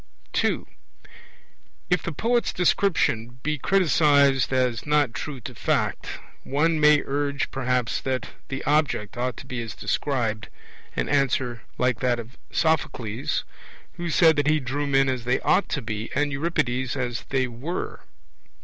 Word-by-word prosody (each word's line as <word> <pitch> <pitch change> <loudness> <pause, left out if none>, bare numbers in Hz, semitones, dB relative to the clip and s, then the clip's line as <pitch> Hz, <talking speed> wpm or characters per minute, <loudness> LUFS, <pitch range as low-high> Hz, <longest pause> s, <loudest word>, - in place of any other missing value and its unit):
II. - - +1 1.3
If 180 -2 +3
the 170 - -4
poet's 235 - +1
description 125 - +1
be 150 -1 -1
criticized 145 -7 +4
as 125 -2 +1
not 150 -5 +3
true 140 +1 -5
to 125 - -7
fact, 110 - -1 0.3
one 155 +3 +1
may 150 -1 +6
urge 140 0 -1
perhaps 125 -2 0
that 130 -4 -2 0.2
the 135 0 -4
object 145 -9 +1
ought 125 0 -2
to - - -9
be 130 -3 -4
as 110 -2 -6
described 115 -6 -1 0.5
an - - -1
answer 130 -4 +1 0.2
like 125 -2 +1
that 125 -1 +1
of 115 +3 -9
Sophocles, 135 -8 0 0.5
who 175 -1 -3
said 160 0 +5
that 145 0 +2
he 155 0 +4
drew 145 +2 -2
men 135 -1 +3
as 130 -2 -1
they 125 +2 +1
ought 195 - +2
to 145 - -2
be, 110 0 -4
and 145 0 +1
Euripides 130 -4 -1
as 125 -4 -3
they 130 -2 +1
were. 130 +9 -5
135 Hz, 150 wpm, -25 LUFS, 125-150 Hz, 1.3 s, may